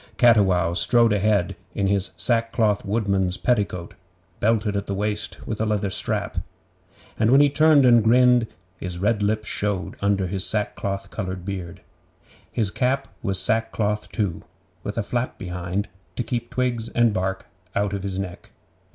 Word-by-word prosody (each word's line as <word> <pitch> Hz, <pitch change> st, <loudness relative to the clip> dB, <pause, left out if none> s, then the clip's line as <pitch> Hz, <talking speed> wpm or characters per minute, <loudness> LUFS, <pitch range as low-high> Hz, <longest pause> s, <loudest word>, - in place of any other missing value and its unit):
Cattiwow 95 Hz, -8 st, +4 dB
strode 115 Hz, +6 st, +4 dB
ahead 100 Hz, -2 st, +1 dB, 0.2 s
in 100 Hz, -, 0 dB
his 100 Hz, -1 st, +1 dB
sackcloth 115 Hz, -3 st, +1 dB
woodman's 100 Hz, -3 st, 0 dB
petticoat, 100 Hz, -8 st, -1 dB, 0.5 s
belted 110 Hz, -1 st, +1 dB
at 100 Hz, 0 st, -2 dB
the 100 Hz, -, -2 dB
waist 105 Hz, +1 st, -2 dB
with 110 Hz, -1 st, -3 dB
a -, -, +2 dB
leather 105 Hz, -2 st, 0 dB
strap; -, -, -1 dB, 0.8 s
and 110 Hz, 0 st, +3 dB
when 135 Hz, +3 st, +6 dB
he 145 Hz, -1 st, +5 dB
turned 155 Hz, -2 st, +5 dB
and 120 Hz, -2 st, +6 dB
grinned, 125 Hz, +1 st, +5 dB, 0.3 s
his 90 Hz, -2 st, -4 dB
red 105 Hz, +3 st, +1 dB
lips 105 Hz, +1 st, 0 dB
showed 100 Hz, -2 st, -2 dB
under 100 Hz, -1 st, +1 dB
his 95 Hz, +1 st, -1 dB
sackcloth 100 Hz, -2 st, -2 dB
coloured 95 Hz, -3 st, -5 dB
beard. 95 Hz, -4 st, -6 dB, 0.7 s
His 105 Hz, -4 st, 0 dB
cap 130 Hz, +4 st, 0 dB
was 100 Hz, -3 st, -1 dB
sackcloth 105 Hz, -1 st, 0 dB
too, 100 Hz, -7 st, -2 dB, 0.4 s
with 100 Hz, -, -5 dB
a 115 Hz, -, 0 dB
flap 120 Hz, +4 st, -2 dB
behind, 90 Hz, +2 st, -3 dB, 0.3 s
to 120 Hz, -, -1 dB
keep 120 Hz, +1 st, -3 dB
twigs 120 Hz, -3 st, -1 dB
and 120 Hz, -2 st, +2 dB
bark 95 Hz, 0 st, -2 dB, 0.3 s
out 100 Hz, 0 st, 0 dB
of 100 Hz, -, -3 dB
his 95 Hz, -1 st, -4 dB
neck. 95 Hz, -2 st, -6 dB
105 Hz, 155 wpm, -23 LUFS, 95-115 Hz, 0.8 s, when